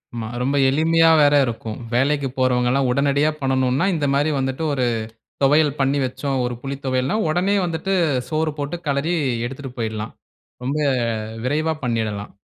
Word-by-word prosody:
ஆமா. 115 -1 -4
ரொம்ப 135 +3 0
எளிமையா 165 +3 +4
வேற 145 0 +5
இருக்கும். 115 -2 -5 0.2
வேலைக்கு 140 +2 +1
போறவங்கல்லாம் 130 +1 +2
உடனடியா 140 +3 +2
பண்ணணுன்னா, 130 +3 +1
இந்த 150 -3 -1
மாரி 145 +3 +2
வந்துட்டு 130 +3 -2
ஒரு 130 -2 0 0.6
தொவையல் 150 +1 +3
பண்ணி 135 +1 +2
வச்சோம். 135 +1 -2
ஒரு 125 0 -3
புளி 135 0 -4
தொவையல்ன்னா, 130 +10 0
உடனே 185 +5 +1
வந்துட்டு 170 +3 -2 0.4
சோறு 155 0 0
போட்டு 145 +5 -3
கெளறி 140 +5 0 0.3
எடுத்துட்டு 135 0 -8
போய்டலாம். 110 -1 -3 0.5
ரொம்ப 135 +4 -1 0.7
விரைவா 155 +4 0
பண்ணிடலாம். 110 -3 -2
140 Hz, 140 wpm, -21 LUFS, 125-155 Hz, 0.7 s, வேற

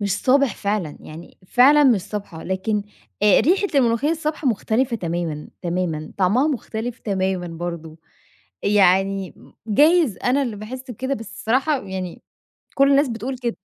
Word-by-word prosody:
مش 200 -2 0
صابِح 275 -1 +3
فعلًا، 200 -7 -2
يعني 160 +3 -12
فعلًا 285 +8 +5
مش 240 -7 +4
صابحة، 200 -5 -7
لكن 195 +3 -1 0.4
آآ، 210 -2 +6
ريحة 370 - +2
الملوخيّة 245 +2 +2
الصابحة 305 -3 -1
مُختلِفة 235 +2 0
تمامًا، 170 -5 -4
تمامًا، 170 -3 -3
طعمَها 205 +10 +3
مُختلف 240 -3 -4
تمامًا 190 -3 -2
برضه، 165 -1 -6 0.7
يعني 195 -1 +2
م - - -18 0.2
جايز 295 - +4
أنا 260 +3 +2
اللي 240 -6 -3
باحِسّ 250 +5 -8
بكده، 260 +4 -3
بس 225 -5 -7
الصراحة 265 +5 +1
يعني 190 -2 -6 0.5
كل 275 0 +4
الناس 280 0 +4
بتقول 245 +3 -4
كده. 240 -2 -3
215 Hz, 145 wpm, -21 LUFS, 185-260 Hz, 0.7 s, آآ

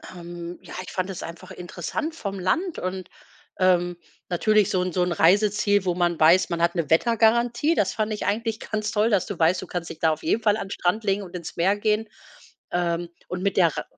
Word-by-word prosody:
Ähm 175 0 -8
ja, - - -12
ich 185 - -9
fand 185 0 -2
es 190 -1 -6
einfach 165 +1 -9
interessant 180 - -5
vom 200 -9 -5
Land 325 - -1
und, 185 0 -4 0.5
ähm, 175 -1 +2 0.3
natürlich 210 +3 +3
so 185 - +1
'n 180 0 -1
so 180 - +1
'n 180 - -1
Reiseziel, 205 +3 +3
wo 180 - 0
man 175 -2 0
weiß, 170 +4 +5
man 170 -1 -2
hat 170 +1 +2
'ne 165 -5 -1
Wettergarantie, 235 - +3
das 205 - +1
fand 215 -1 -1
ich 210 - -4
eigentlich 220 +2 -1
ganz 215 -1 -3
toll, 215 +1 +2
dass 200 -5 +2
du 200 - -6
weißt, 170 +3 +3
du 185 - -8
kannst 175 -2 -4
dich - - -9
da 160 - +3
auf 155 - -4
jeden 225 - +1
Fall 210 -1 +3
an 200 - -5
'n - - -12
Strand 190 +5 0
legen 200 0 0
und 180 -1 -10
ins 170 -2 -7
Meer 185 +4 +2
gehen. 215 +1 0 0.6
Ähm, 175 -1 -1 0.2
und 180 +1 -4
mit 200 - 0
der 170 -5 +4
Rei - - -2
185 Hz, 230 wpm, -24 LUFS, 175-215 Hz, 0.6 s, weiß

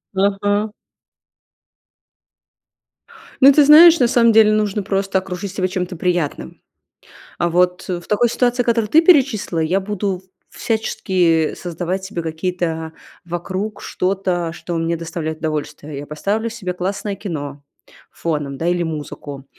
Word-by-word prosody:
Ага. 205 +2 +1 2.7
Ну, 275 +1 +8
ты 295 - +6
знаешь, 320 +3 +8
на 245 - +4
самом 235 -1 +4
деле 215 -1 +6
нужно 210 -1 0
просто 195 -1 0
окружить 185 +1 -6
себя 185 -2 0
чем-то 180 -1 -4
приятным. 165 - -2 0.8
А, 175 - 0
вот 180 +1 +1
в 180 -2 -3
такой 215 +3 +2
ситуации, 245 +1 +1
которую 230 -3 +1
ты 320 - +6
перечислила, 270 - +3
я 165 +4 +1
буду 195 -1 -3 0.3
в - - -17
всячески 180 -7 0
создавать 175 +2 -4
себе 190 -3 -5
какие-то 160 0 -3 0.3
вокруг 185 +5 -4
что-то, 185 -3 -1
что 170 +1 -6
мне 165 +1 -1
доставляет 160 -1 -5
удовольствие. 150 -1 -4
Я 145 - -6
поставлю 205 +9 -2
себе 195 -5 -5
классное 195 +3 -3
кино 145 -8 -6 0.5
фоном, 150 -4 -3
да, 165 - -1
или 175 0 +1
музыку. 145 -3 -6
185 Hz, 130 wpm, -19 LUFS, 165-210 Hz, 2.7 s, Ну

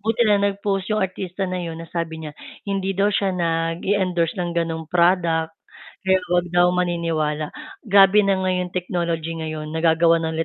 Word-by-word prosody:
buti 225 +3 +1
nalang 200 -1 +3
nag-post 195 -1 -2
yung 215 - +1
artista 185 +1 -4
na 185 - -3
'yun 165 -2 -5
na 165 - -8
sabi 165 -2 -3
niya, 150 - -7 0.4
hindi 195 0 -1
daw 200 +1 +3
siya 195 0 +1
nag-e-endorse 170 +1 0
ng 175 - -2
ganong 165 -1 -1
product. 170 -2 +2 0.5
Kaya 190 0 +3
huwag 175 0 +2
daw 175 0 +4
maniniwala. 165 -4 -1 0.4
Grabe 200 +1 +6
na 195 -1 +2
nga 185 0 0
'yong 180 -1 -2
technology 170 -2 -2
ngayon, 155 -1 -5
nagagawan 165 +1 +3
na 160 - -1
li 165 - 0
175 Hz, 170 wpm, -22 LUFS, 165-190 Hz, 0.5 s, Grabe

